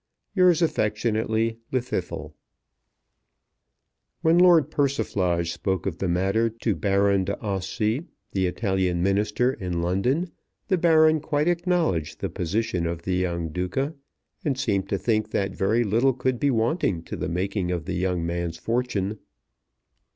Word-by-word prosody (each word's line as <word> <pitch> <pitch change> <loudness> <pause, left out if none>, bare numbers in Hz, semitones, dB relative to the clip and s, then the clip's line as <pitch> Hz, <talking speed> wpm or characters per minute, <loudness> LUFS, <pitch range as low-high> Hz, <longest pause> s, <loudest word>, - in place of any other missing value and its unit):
Yours 180 -4 +4
affectionately, 110 -3 0
LLWDDYTHLW. 125 -1 -3 1.9
When 165 +2 +5
Lord 170 -5 +6
Persiflage 95 - 0
spoke 90 +2 -2
of 90 -4 -3
the 95 - -1
matter 95 +6 +1
to 115 0 -2
Baron 100 -1 +2
d'Ossi, 105 - -2 0.2
the 95 -2 +1
Italian 95 -2 0
Minister 105 +6 +1
in 90 -6 -3
London, 125 - 0 0.4
the 190 - +3
Baron 160 -2 +5
quite 150 +1 0
acknowledged 170 - 0
the - - -2
position 90 -1 -1
of 85 0 -4
the 95 - -1
young 85 -2 -1
Duca, 90 - -2 0.5
and 140 -6 0
seemed 100 -6 0
to 100 - 0
think 110 +2 0
that 100 -2 -1
very 110 +5 +2
little 115 +5 +2
could 130 0 -1
be 145 - +2
wanting 115 - 0
to - - -6
the - - -3
making 95 +1 -1
of 85 -3 -2
the 90 - -3
young 90 -1 -1
man's 85 -1 -3
fortune. 110 -2 -1
105 Hz, 135 wpm, -25 LUFS, 90-130 Hz, 1.9 s, Lord